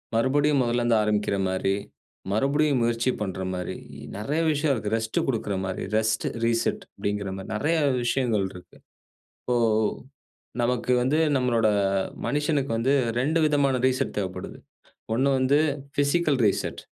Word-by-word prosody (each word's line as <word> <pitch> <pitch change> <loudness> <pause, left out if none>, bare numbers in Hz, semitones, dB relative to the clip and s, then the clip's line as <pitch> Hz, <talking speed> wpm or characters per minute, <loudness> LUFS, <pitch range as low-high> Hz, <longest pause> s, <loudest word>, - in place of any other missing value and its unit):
மறுபடியும் 140 +4 +3
முதல்ல 120 0 0
இருந்து 120 -1 +3
ஆரம்பிக்கிற 105 -1 0
மாரி, 95 +1 0 0.6
மறுபடியும் 140 +4 +2
முயற்சி 115 +2 +1
பண்ணுற 95 -2 -3
மாரி, 90 0 -4 0.4
நெறைய 145 +10 -2
விஷயம் 145 -1 +1
இருக்கு. 110 -3 -3
ரெஸ்ட் 110 0 -2
குடுக்கிற 110 -5 -1
மாரி, 95 -1 -4
ரெஸ்ட், 110 0 0 0.2
ரீசெட் 115 0 0
அப்படிங்கிற 100 -1 -3
மாரி 95 - -8
நெறைய 150 +10 +1 0.3
விஷயங்கள் 120 -6 +1
இருக்கு. 90 - -14 0.6
இப்போ 125 -1 0 1.0
நமக்கு 125 +1 0
வந்து 135 +5 +1 0.2
நம்மளோட 120 -4 +2 0.6
மனிசனுக்கு 145 -3 0
வந்து 130 +4 +2 0.3
2 155 +6 +1
விதமான 140 -3 +2
ரீசெட் 130 0 -1
தேவைப்படுது. 95 -2 -4 0.6
ஒண்ணு 130 +4 +2
வந்து 130 +3 +3 0.4
பிசிக்கல் 145 0 +2
ரீசெட். 100 - -1
120 Hz, 130 wpm, -25 LUFS, 105-140 Hz, 1.0 s, மறுபடியும்